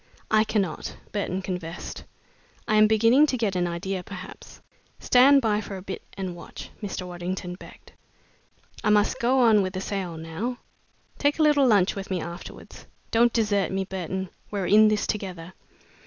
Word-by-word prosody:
"I 215 0 +5
cannot," 195 -8 -2
Burton 190 -2 -2
confessed. 180 -2 -6 0.6
"I - - +1
am 215 0 +7
beginning 230 +7 +5
to 260 - -1
get 215 -5 -1
an 175 -1 +1
idea, 180 +2 -3
perhaps." 185 0 -10 0.4
"Stand 270 +2 +5
by 210 -1 +1
for 200 -2 -7
a 185 - -9
bit 190 -1 -6 0.2
and 185 -2 -4
watch," 170 - -10
Mr. 195 -3 -4
Waddington 180 0 -5
begged. 180 - -14 0.9
"I - - +2
must 210 -1 +3
go 255 +2 +3
on 220 -4 +5
with 185 -1 -2
the 185 - -3
sale 190 -4 -4
now. 165 +10 -4 0.6
Take 285 +1 +2
a 315 - +3
little 290 -3 +4
lunch 200 -5 +4
with 195 -1 -6
me 185 -2 -1
afterwards. 170 +2 -9 0.2
Don't 235 +1 +4
desert 210 -4 +1
me, 190 0 -1
Burton. 190 0 -4 0.2
We're 200 -3 -2
in 215 +3 +6
this 215 -1 +1
together." 185 -4 -5
195 Hz, 170 wpm, -25 LUFS, 180-220 Hz, 0.9 s, am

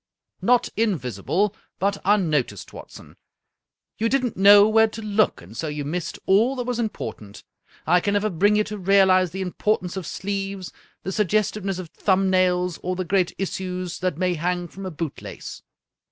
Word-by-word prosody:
" - - -49
Not 245 - +4
invisible, 185 - 0 0.2
but 200 +1 0
unnoticed, 155 - 0
Watson. - - -12 0.8
You 225 +1 +1
did 270 +1 +1
not 245 - -2
know 200 +1 +7
where 220 +1 +5
to 220 +1 -8
look, 210 - +1
and 95 +6 -13
so 155 - -3
you 150 -1 -4
missed 170 +3 -4
all 225 +8 +3
that 250 - -3
was 245 -1 -2
important. 110 - -5 0.4
I 180 +2 +4
can 200 +3 -1
never 210 +1 +1
bring 205 +5 +3
you 210 - +3
to 210 -1 -7
realize 190 -1 +4
the 190 +2 -4
impor 210 +4 0
tance 180 0 -7
of 190 -4 -5
sleeves, 195 -1 -4 0.3
the 190 - -3
suggestiveness 205 -1 0
of 180 -3 -7
thumb 190 -1 +1
nails, 180 -1 +1
or 185 +1 -2
the 185 0 -3
great 185 0 +1
issues 185 -2 -4
that 185 -4 -1
may 180 0 +1
hang 175 +2 -2
from 190 +3 -8
a - - -3
boot 160 -2 -5
lace. - - -9
190 Hz, 180 wpm, -23 LUFS, 175-205 Hz, 0.8 s, know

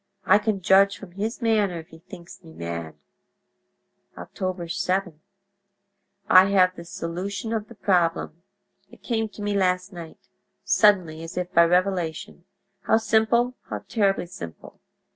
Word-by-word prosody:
I - - +5
can 210 -3 -2
judge 195 +1 +4
from 195 -3 -12
his 220 +7 -4
manner 210 -6 +1
if 160 +1 -13
he 160 - -15
thinks 175 +1 -13
me 160 -1 -14
mad. 85 - -6 1.2
"Oct. - - -11
7.—I 195 +2 -1
have 185 -2 +3
the 170 - -10
solution 185 +6 -5
of 215 -2 -3
the 235 - -14
problem; 175 -4 0 0.5
it - - -18
came 225 -2 -1
to 205 - -10
me 205 0 -1
last 185 0 0
night—suddenly, 170 +1 -1
as 165 +2 -9 0.2
by 170 0 +6
revelation. 180 -1 -1 0.4
How 220 - +5
simple—how 225 +3 0
terribly 200 -5 +1
simple! 85 - -11
190 Hz, 125 wpm, -24 LUFS, 170-205 Hz, 1.2 s, by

